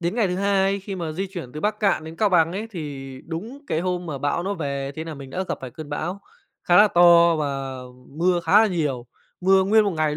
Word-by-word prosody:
đến 175 +4 -1
ngày 220 -6 +1
thứ 180 - -2
2 195 0 +1
khi 195 0 -6
mà 165 -3 -4
di 190 +4 -3
chuyển 175 -10 -8
từ 150 - -6
Bắc 210 +1 -1
Kạn 200 -6 +1
đến 160 +1 -9
Cao 210 - +2
Bằng 170 -2 +3
ấy, 210 +4 -4
thì 140 -7 -7
đúng 205 +12 -6
cái 160 - -1
hôm 180 -1 -2
mà 145 -4 -4
bão 145 +5 -1
nó 200 +2 -2
về 140 -4 -4
thế 160 - -5
nà 160 -2 -6
mình 135 -1 -10
đã 185 +5 -3
gặp - - -3
phải 130 -2 -7
cơn 155 +1 -9
bão 175 +6 -4 0.4
khá 175 - +4
là 210 0 +7
to 170 -1 +6
và 135 -3 -3 0.3
mưa 175 +4 +1
khá 200 +6 +6
là - - +4
nhiều, 145 - -2 0.3
mưa 190 +1 +4
nguyên 215 +2 +4
một 200 - +1
ngày 155 -3 -1
170 Hz, 255 wpm, -23 LUFS, 150-195 Hz, 0.4 s, là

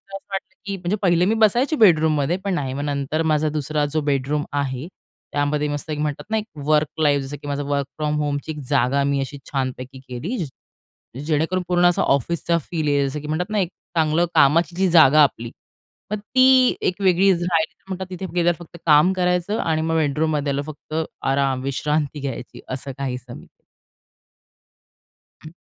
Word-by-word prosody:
असं 195 - -9
वाटलं, 195 -1 -5
की 200 -1 -3
म्हणजे 180 +3 -1
पहिले 175 -2 +3
मी 220 +4 +2
बसायची 235 +7 +3
बेडरूममध्ये 160 - +3
पण 195 -2 -1
नाही. 135 -6 -2
मग 140 +2 -3
नंतर 145 +2 -1
माझा 155 0 +2
दुसरा 150 0 -1
जो 155 - +1
बेडरूम 145 +1 -1
आहे 135 0 -2 0.5
त्यामध्ये 145 +1 0
मस्त 145 +2 -4
एक 150 - -3
म्हणतात 150 -2 -2
ना 220 - +2
एक 215 - -2 0.2
वर्क 150 0 +3
लाईफ, 145 -2 +3
जसं 140 +2 -6
की - - -8
माझ्या 145 0 -2
वर्क 140 -1 -1
फ्रॉम 150 -1 -1
होमची 145 +1 -2
एक 150 - -7
जागा 140 0 +2
मी 140 0 +1
अशी 135 +1 -5
छानपैकी 130 -1 -4
केली. 155 - -4 0.9
जेणेकरून 160 +4 0
पूर्ण 175 0 +3
असा 175 - +3
ऑफिसचा 170 +5 +1
फील 160 0 -3
येईल. 140 -1 +2
जसं 150 +2 -5
की 150 - -8
म्हणतात 175 +6 -2
ना, 215 - +1
एक 180 -4 0 0.3
चांगलं 160 +2 +3
कामाची 165 +5 +4
जी 190 +1 +2
जागा 155 -3 +7
आपली, 120 -4 -1 0.6
मग 215 - 0
ती 255 +3 +4
एक 185 +2 -1
वेगळी 190 +1 +4
राहिली 175 -2 0
तर - - -42
म्हणतात 190 0 -4
तिथे 185 0 -6
गेल्यावर 175 -1 +2
फक्त 170 - -14
काम 155 +4 +5
करायचं 180 +3 0
आणि 160 -1 0
मग 160 +1 -1
बेडरूममध्ये 150 -1 0
आल्यावर 140 +2 -3
फक्त 155 +1 -15 0.3
आराम 135 -1 +1
विश्रांती 150 +2 -1
घ्यायची. 135 -2 -6
असं 130 +1 -5
काहीसं. 125 -3 -5 2.0
हं. 155 - -9
155 Hz, 180 wpm, -22 LUFS, 140-175 Hz, 2.0 s, जागा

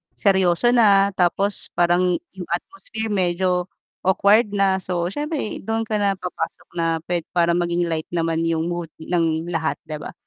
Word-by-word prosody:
seryoso 190 +2 +3
na 200 -4 +5
tapos 195 +3 0
parang 175 +1 +3 0.2
'yung 180 -2 -7
atmosphere 300 - -4
medyo 180 -1 +1 0.3
awkward 200 +4 +4
na, 195 -2 +1
so 175 -2 -1
siyempre 295 -5 -3
dun 225 +2 -2
ka 220 - -5
na 200 -1 +1
papasok 180 -1 -5
na 165 -1 0
puwed 175 -1 -1
para 170 -1 +3
maging 175 0 0
light 160 -1 -3
naman 165 -1 0
'yung 165 -1 0
mood 175 -2 -4
ng 165 -1 0
lahat 165 -2 -1
'di 155 - -5
ba? - - -7
180 Hz, 160 wpm, -22 LUFS, 170-200 Hz, 0.3 s, na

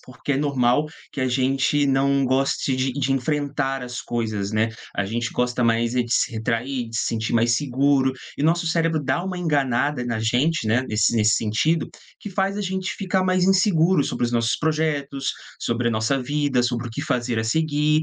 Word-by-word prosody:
porque 130 +2 -5
é 135 - +1
normal 140 0 +2 0.3
que - - -4
a 130 - +1
gente 135 +3 +1
não 135 0 +2
goste 130 0 +1
de 130 0 0
de 135 0 0
enfrentar 140 0 -1
as 125 0 -5
coisas, 110 -4 -3
né, 110 +1 +2 0.3
a 100 - 0
gente 115 +3 -2
gosta 125 0 0
mais 115 +1 +1
é 125 - +3
de 120 -1 -4
se - - +2
retrair, 115 +3 -2
de 115 - -5
se - - 0
sentir 115 -1 -2
mais 115 0 +3
seguro, 135 0 +2 0.3
e - - -1
nosso 165 +2 +2
cérebro 165 -1 +1
dá 175 +6 -1
uma 185 -1 -4
enganada 145 -4 0
na 115 -2 -2
gente, 125 +5 +1
né, 115 +4 +2
nesse 110 +2 +2
s - - +1
nesse 110 -1 +4
sentido, 135 +10 0 0.3
que - - -7
faz 195 +1 -1
a - - -2
gente 190 -1 -2
ficar 190 -1 0
mais 185 -1 +2
inseguro 185 -4 +3
sobre - - -2
os 120 - -3
nossos 115 -1 +1
projetos, 150 -3 -1 0.3
sobre 120 0 -1
a - - 0
nossa 110 +5 0
vida, 140 -2 0
sobre 120 -1 -1
o - - -7
que 115 - -5
fazer 125 -5 -1
a 110 - -1
seguir. 150 +4 +1
135 Hz, 205 wpm, -23 LUFS, 120-150 Hz, 0.3 s, nesse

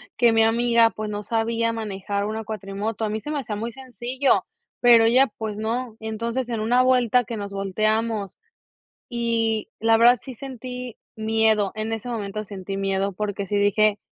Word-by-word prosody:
que 235 -1 +4
mi 225 0 +4
amiga, 230 0 +4
pues, 215 0 -5
no 210 0 -4
sabía 230 +1 0
manejar 200 -2 -3
una 220 +1 -3
cuatrimoto, 210 +1 -4
a 215 - 0
mí 215 +1 -2
se 295 - -6
me 300 - -1
hacía 220 -5 -4
muy 230 +3 -4
sencillo, 255 +1 0 0.3
pero 235 -2 +7
ella, 255 +4 +5
pues, 215 -2 -4
no. 225 +1 -3
Entonces, 230 +3 -3
en 230 -2 -2
una 240 +3 +3
vuelta 250 -1 +3
que 230 +1 -5
nos 200 -2 -5
volteamos, 215 +1 -1 0.7
y 230 -2 0
la 225 0 +4
verdad 240 +1 +6
sí 260 - -8
sentí 250 -1 -7 0.2
miedo, 220 -2 +2
en 215 +1 -3
ese 225 +2 -4
momento 215 -2 -4
sentí 195 -1 -6
miedo, 195 0 0
porque 205 0 -3
sí 205 - -1
dije 205 +1 +3
225 Hz, 175 wpm, -24 LUFS, 210-235 Hz, 0.7 s, pero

